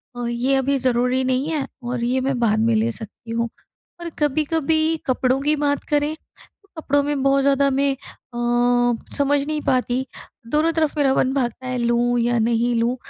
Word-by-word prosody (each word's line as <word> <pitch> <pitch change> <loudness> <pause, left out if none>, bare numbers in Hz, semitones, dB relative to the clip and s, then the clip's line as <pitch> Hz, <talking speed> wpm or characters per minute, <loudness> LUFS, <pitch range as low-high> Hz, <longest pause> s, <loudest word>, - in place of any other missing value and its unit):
अ, 245 0 -4
ये 250 +3 0
अभी 275 +1 +1
ज़रूरी 250 +1 +1
नहीं 260 +2 0
है 290 -4 -1 0.2
और 240 0 -3
ये 255 +2 +1
मैं 265 -1 -1
बाद 220 -2 +2
में 225 +1 +2
ले 225 +2 +1
सकती 225 +1 -9
हूँ। 230 0 -1 0.5
और 340 - -4
कभी-कभी 315 +2 +1
कपड़ों 255 0 +1
की 300 +2 +2
बात 285 -1 0
करें, 295 +1 +1
तो 400 +5 -26
कपड़ों 285 0 +2
में 290 -1 -1
बहुत 275 0 +3
ज़्यादा 280 0 +3
मैं 275 +1 +1
अ, 255 -2 -14 0.8
समझ 285 0 +2
नहीं 305 -1 -2
पाती, 255 0 0 0.4
दोनों 305 +6 +2
तरफ़ 310 -2 +1
मेरा 275 -2 +3
मन 260 0 +1
भागता 255 -1 -2
है 255 - -2
लूँ 240 0 +1
या 240 0 +1
नहीं 235 +1 +1
लूँ? 235 +2 +1
265 Hz, 185 wpm, -21 LUFS, 240-285 Hz, 0.8 s, बहुत